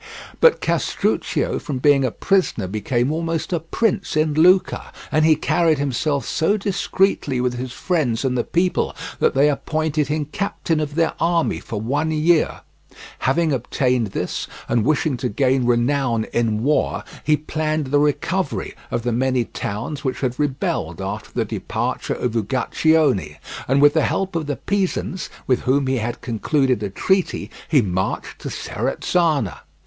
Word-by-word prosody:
But 485 - +5
Castruccio - - 0
from 140 -4 -4
being 140 +1 +4
a 130 - +2
prisoner 185 - 0
became 120 +7 -1
almost 165 +2 -2
a 170 - +1
prince 190 +2 -1
in 155 0 +2
Lucca, 180 +5 +3 0.2
and 155 - +3
he 160 0 +6
carried 165 0 +2
himself 140 -1 -1
so 200 +7 +1
discreetly 195 - 0
with 125 0 0
his 125 +1 -5
friends 140 -6 -1
and 130 -1 +1
the 120 - +1
people 180 +1 0 0.2
that - - +2
they 140 +2 +5
appointed 155 0 0
him 150 0 -1
captain 170 -5 -1
of 150 -1 -3
their 165 -1 +2
army 170 0 +1
for 110 - -5
one 145 +8 -1
year. 160 +1 +2 0.6
Having 155 +3 +1
obtained 125 -1 0
this, 95 - -3 0.2
and 115 -1 +1
wishing 150 0 +1
to - - -2
gain 130 +2 +1
renown 120 -1 +2
in 115 -2 +1
war, 150 +3 +1 0.2
he 150 0 +3
planned 155 0 -2
the 145 - +4
recovery 150 - -1 0.2
of 120 - -2
the 120 - 0
many 125 0 +1
towns 115 +11 -5
which 130 -2 -2
had 125 -1 -2
rebelled 145 -3 -1
after - - -5
the - - -1
departure - - -3
of 120 -2 -2
Uguccione, 130 - +1 0.3
and 135 +2 +3
with 145 0 +7
the 160 - +3
help 190 -2 -1
of 160 -3 -2
the 145 - -1
Pisans, 190 -2 -2 0.2
with 125 - +2
whom 135 +2 +1
he 130 0 +1
had 120 +1 -3
concluded 125 +1 0
a 105 - -2
treaty, 190 - 0 0.2
he 140 -6 +4
marched 95 -1 -2
to - - -5
Serezzana. 155 - -1
145 Hz, 160 wpm, -21 LUFS, 125-160 Hz, 0.6 s, with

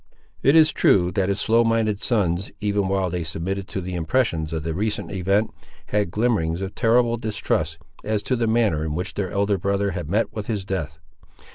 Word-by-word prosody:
It 140 +4 +4
is 155 -1 +6
true 90 -2 +3
that 95 -1 0
his 100 0 0
slow 115 +2 +3
minded 115 -3 +1
sons, 95 -6 0
even 100 -2 0
while 95 -2 0
they 90 -1 -2
submitted 90 +4 -3
to 95 - -4
the 90 +1 -5
impressions 85 -2 0
of 80 -1 -3
the 80 0 -2
recent 105 +5 -2
event, 100 +3 +1 0.4
had 105 -3 +1
glimmerings 95 -5 0
of 95 - -5
terrible 120 +1 +2
distrusts, 100 -8 -1 0.3
as 105 -1 -1
to 130 - 0
the 115 -1 0
manner 110 -9 +2
in 75 -1 -3
which 90 +3 -3
their 95 -3 -2
elder 100 +1 0
brother 100 +1 0
had 90 -4 -5
met 110 +5 0
with 105 -2 -5
his 105 -5 -2
death. 80 -6 -3
100 Hz, 200 wpm, -23 LUFS, 90-110 Hz, 0.4 s, is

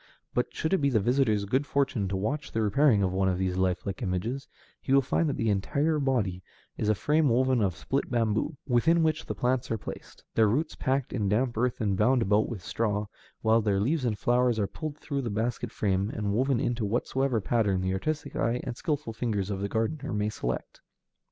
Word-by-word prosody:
But, 125 - 0
should 160 - -2
it 190 - +3
be 140 -1 +2
the 120 -5 +3
visitor's 110 -2 +2
good 130 +8 0
fortune 135 -8 0
to 95 0 -2
watch 140 +10 -2
the 110 - +1
repairing 110 0 +4
of 95 -1 0
one 95 0 +1
of 90 - 0
these 95 -1 -1
lifelike 95 +1 -1
images, 115 +7 -2 0.3
he - - -4
will 140 - +5
find 155 +4 +1
that - - -2
the 115 -2 +1
entire 145 +10 +1
body 115 -10 0 0.3
is 105 - -1
a 110 - +4
frame 150 +6 +2
woven 130 0 +3
of 95 -5 +1
split 135 +1 -2
bamboo, 115 +5 0
within 160 +7 +3
which 155 0 0
the - - -3
plants 125 0 0
are 115 - 0
placed, - - -9
their 110 -1 +4
roots 145 +9 0
packed 130 0 -1
in 105 -5 0
damp 120 +4 +1
earth 120 +2 0
and 100 -4 0
bound 125 +3 +3
about 105 +2 +2
with 105 -7 -6
straw, 105 0 -1 0.4
while 110 +1 +4
their 100 -2 +1
leaves 135 +8 +1
and 115 -4 0
flowers 120 +1 +2
are 105 - +1
pulled 150 +8 -6
through 140 -2 -3
the 120 - -3
basket 110 +3 -2
frame 100 0 0
and 105 -3 -2
woven 130 +2 +2
into 120 -4 -1
whatsoever 120 +3 0
pattern 105 -3 +1
the 95 0 0
artistic 155 +11 -3
eye 115 +2 0
and 125 -3 -4
skillful 145 -7 -2
fingers 105 -4 -2
of 95 - -2
the 100 - -2
gardener 115 +8 -2
may 105 -1 0
select. 65 -11 -4
115 Hz, 215 wpm, -28 LUFS, 105-135 Hz, 0.4 s, will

